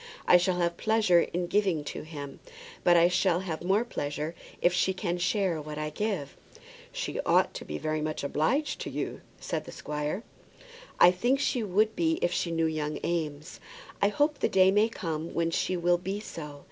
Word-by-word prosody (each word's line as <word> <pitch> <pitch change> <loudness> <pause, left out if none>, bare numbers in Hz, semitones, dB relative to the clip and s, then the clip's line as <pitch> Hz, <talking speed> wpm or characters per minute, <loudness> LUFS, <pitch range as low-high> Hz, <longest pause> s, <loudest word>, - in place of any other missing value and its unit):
I 180 - +8
shall 180 +1 +1
have 170 -1 0
pleasure 220 -5 +3
in 175 +1 -2
giving 190 -5 +1
to - - -6
him; 145 -3 -8 0.4
but 175 -1 +6
I 170 +1 +6
shall 180 0 +2
have 170 -4 -4
more 195 +6 +2
pleasure 150 -5 -3 0.3
if 175 - +3
she 185 +1 +1
can 175 -2 -2
share 180 -3 0
what 150 0 -7
I 150 0 -3
give." 195 -6 -3 0.6
"She - - -4
ought - - +3
to - - -7
be - - -4
very 155 0 -2
much 155 -1 -3
obliged 160 - 0
to - - -4
you," - - -4 0.2
said - - -3
the - - -9
squire. 150 +7 -4 0.8
"I 175 - +8
think 245 +9 +1
she 260 -3 0
would 215 +2 +1
be 160 -1 +1
if 175 - +2
she 175 - -1
knew 165 -1 +1
young 155 -1 -2
Eames. 155 -3 -3 0.4
I 200 - +5
hope 290 +7 +1
the - - +1
day 190 0 +5
may 210 +3 +3
come 165 -6 -4
when 165 0 +1
she 185 +2 0
will 175 0 +2
be 190 +3 -3
so. 150 -8 -8
175 Hz, 195 wpm, -28 LUFS, 155-195 Hz, 0.8 s, I